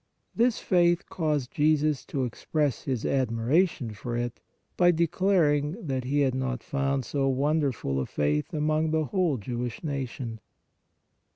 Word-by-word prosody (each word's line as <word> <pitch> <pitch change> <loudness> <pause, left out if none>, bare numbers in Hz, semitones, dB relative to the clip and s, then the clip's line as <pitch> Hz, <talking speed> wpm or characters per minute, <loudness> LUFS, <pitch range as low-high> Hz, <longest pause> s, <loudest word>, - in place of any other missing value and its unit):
This 235 0 +3
faith 175 -1 +2
caused 150 -6 -1
Jesus 150 -1 +2
to 135 -3 -2
express 145 +3 -2
His 130 -4 -2
admiration 130 - +1
for 120 +3 -4
it 120 -1 -3 0.4
by 175 -1 +5
declaring 165 -3 +2
that 130 -3 -2
He 145 +3 +1
had 135 -2 +2
not 130 -2 -2
THE - - -25
CENTURION 135 0 -1
77 - - +1
found 135 -2 -1
so 140 -2 0
wonderful 135 - 0
a 65 - -1
faith 75 0 0
among 155 +1 +1
the 155 0 +1
whole 175 -5 +1
Jewish 120 - -4
nation. 130 -6 -4
140 Hz, 155 wpm, -27 LUFS, 125-155 Hz, 0.4 s, by